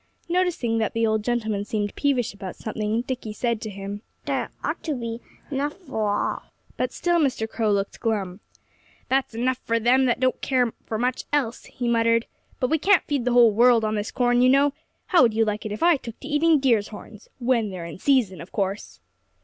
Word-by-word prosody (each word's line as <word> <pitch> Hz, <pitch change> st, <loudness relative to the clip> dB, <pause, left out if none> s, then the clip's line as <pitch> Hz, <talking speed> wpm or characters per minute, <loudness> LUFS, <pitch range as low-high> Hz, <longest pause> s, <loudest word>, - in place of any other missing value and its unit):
Noticing 340 Hz, -11 st, 0 dB
that 220 Hz, -, -1 dB
the 230 Hz, 0 st, +1 dB
old 220 Hz, -1 st, +1 dB
gentleman 220 Hz, -4 st, -1 dB
seemed 205 Hz, -1 st, -2 dB
peevish 265 Hz, -7 st, 0 dB
about 195 Hz, -2 st, -7 dB
something, 220 Hz, +1 st, -2 dB
Dickie 250 Hz, -4 st, -5 dB
said 235 Hz, 0 st, -1 dB
to 215 Hz, -, -5 dB
him: 200 Hz, +1 st, -6 dB, 0.2 s
"There -, -, -1 dB
ought -, -, -2 dB
to 310 Hz, -3 st, -1 dB
be 230 Hz, -1 st, -5 dB, 0.3 s
enough 285 Hz, +2 st, -1 dB
for 220 Hz, -, -3 dB
all." 205 Hz, -, -1 dB, 0.3 s
But -, -, -1 dB
still 345 Hz, -1 st, +1 dB
Mr. 260 Hz, -7 st, 0 dB
Crow 220 Hz, -1 st, 0 dB
looked 200 Hz, 0 st, -1 dB
glum. 200 Hz, -5 st, -2 dB, 0.7 s
"There's 265 Hz, -3 st, 0 dB
enough 255 Hz, +2 st, 0 dB
for 230 Hz, -2 st, 0 dB
them 250 Hz, +4 st, +4 dB
that 245 Hz, -, +1 dB
don't 255 Hz, 0 st, +1 dB
care 250 Hz, -4 st, +1 dB
for 220 Hz, -, -2 dB
much 250 Hz, +2 st, -1 dB
else," 265 Hz, -5 st, -1 dB
he 245 Hz, -, -5 dB
muttered. 230 Hz, 0 st, +3 dB, 0.3 s
"But 255 Hz, -, 0 dB
we 320 Hz, -, +3 dB
can't 390 Hz, +3 st, +4 dB
feed 280 Hz, -5 st, -2 dB
the 250 Hz, -, +1 dB
whole 240 Hz, -2 st, +7 dB
world 235 Hz, +1 st, +4 dB
on 215 Hz, -, -1 dB
this 210 Hz, 0 st, -2 dB
corn, 245 Hz, -1 st, +2 dB
you 255 Hz, -, +5 dB
know.... 275 Hz, +1 st, +4 dB, 0.3 s
How 360 Hz, -, +4 dB
would 230 Hz, -4 st, +4 dB
you 225 Hz, 0 st, +3 dB
like 215 Hz, +1 st, -2 dB
it -, -, -7 dB
if 210 Hz, -, -3 dB
I 340 Hz, -2 st, +5 dB
took 230 Hz, -4 st, -10 dB
to -, -, -7 dB
eating 305 Hz, +1 st, +3 dB
deer's 235 Hz, -6 st, +2 dB
horns 210 Hz, 0 st, -12 dB
when 235 Hz, -4 st, +1 dB
they're 180 Hz, -3 st, -6 dB
in 170 Hz, +1 st, -8 dB
season, 240 Hz, -10 st, +2 dB
of 170 Hz, -, -11 dB
course?" 195 Hz, 0 st, -3 dB
235 Hz, 210 wpm, -24 LUFS, 215-260 Hz, 0.7 s, whole